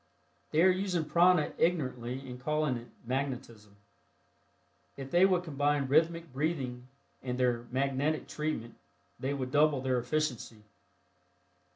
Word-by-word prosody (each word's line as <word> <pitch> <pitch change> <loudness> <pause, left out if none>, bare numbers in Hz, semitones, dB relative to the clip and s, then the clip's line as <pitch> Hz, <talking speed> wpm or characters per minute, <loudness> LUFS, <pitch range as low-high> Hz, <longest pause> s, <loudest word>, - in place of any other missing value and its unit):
They 160 +2 +3
are 185 - +7
using 185 -3 -1
prana 175 +1 +4
ignorantly 130 -6 -1
and 125 -1 -8
calling 150 -1 0
it 120 0 -7 0.2
"magnetism." 120 -5 -4 1.2
If 135 -1 -7
they 175 +2 +6
would 180 -2 +1
combine 145 -3 0
rhythmic 165 0 +2
breathing 130 -4 -2 0.3
with 125 -1 -3
their 120 -2 0
"magnetic" 140 +4 0
treatment 150 -7 -3 0.5
they 135 +2 -2
would 130 -2 -4
double 150 -1 +4
their 130 -1 0
efficiency. 125 -4 -2
140 Hz, 125 wpm, -31 LUFS, 125-155 Hz, 1.2 s, are